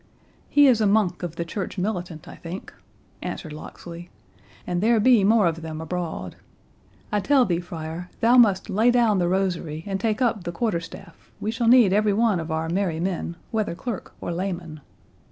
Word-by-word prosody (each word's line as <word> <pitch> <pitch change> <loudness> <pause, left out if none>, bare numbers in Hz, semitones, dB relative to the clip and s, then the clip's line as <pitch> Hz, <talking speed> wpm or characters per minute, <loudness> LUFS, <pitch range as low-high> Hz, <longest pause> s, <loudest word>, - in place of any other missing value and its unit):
"He 290 0 +6
is 245 -5 +5
a 210 - +4
monk 200 -4 +2
of 175 -2 -5
the 170 - -3
church 195 +3 -5
militant, 180 -5 -3
I - - -9
think," 175 +3 -8 0.5
answered 155 -3 -5
Locksley; 170 +3 -10 0.6
"and 175 0 -1
there 225 +1 +4
be 230 -1 +5
more 215 0 +4
of 165 -1 0
them 160 -1 -6
abroad. 170 +1 -4 0.7
I 210 - +2
tell 265 +4 +4
thee, 170 -4 0
friar, 170 0 -7
thou 235 +2 +4
must 205 -6 +5
lay 220 +4 +3
down 235 -5 +3
the 175 - +1
rosary 175 -4 -1
and 195 -1 -2
take 215 +2 0
up 230 -7 +1
the 175 - -4
quarter 210 -1 -1
staff; 165 0 -12
we 215 - -2
shall 230 +1 -1
need 235 -5 +6
every 210 0 +3
one 215 -3 +2
of 165 0 -5
our 160 0 -1
merry 175 -2 -1
men, 175 -1 -2 0.2
whether 215 -6 -1
clerk 230 +3 -6
or - - -4
layman. 175 -4 -4
185 Hz, 190 wpm, -24 LUFS, 170-220 Hz, 0.7 s, He